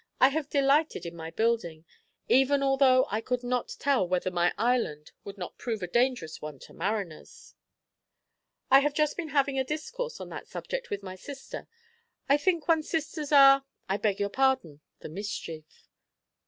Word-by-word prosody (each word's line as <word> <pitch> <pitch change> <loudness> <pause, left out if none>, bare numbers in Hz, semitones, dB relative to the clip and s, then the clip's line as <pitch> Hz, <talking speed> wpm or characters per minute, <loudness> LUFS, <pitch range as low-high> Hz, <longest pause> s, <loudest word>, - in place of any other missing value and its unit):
I 260 - +7
have 290 0 -3
delighted 280 - +2
in 170 0 -6
my 165 -1 -7
building; 175 -7 -1 0.4
even 270 +2 +4
although 270 -1 +4
I 215 +2 0
could 250 +1 -2
not 250 0 -2
tell 270 -9 +1
whether 185 +1 0
my 175 0 +2
island 225 -11 0
would 200 0 -9
not 180 - -7
prove 220 -5 -3
a - - -2
dangerous 240 -6 0
one 150 -2 -7
to - - -13
mariners." 190 -3 -5 1.2
"I 270 - +9
have 290 +1 0
just 300 -1 +1
been 325 -3 -4
having 280 -1 +1
a - - +2
discourse 460 - -5
on - - -7
that - - -8
subject - - -5
with 200 0 -4
my 185 -1 -6
sister. 270 +8 -9 0.6
I 280 - +5
think 335 0 0
one's 320 -2 +2
sisters 310 -2 -3
are 275 -1 +8 0.2
I 195 - 0
beg 205 -1 0
your 200 0 0
pardon! 260 - +1 0.2
the - - -7
mischief. 165 -4 -7
250 Hz, 170 wpm, -28 LUFS, 185-280 Hz, 1.2 s, I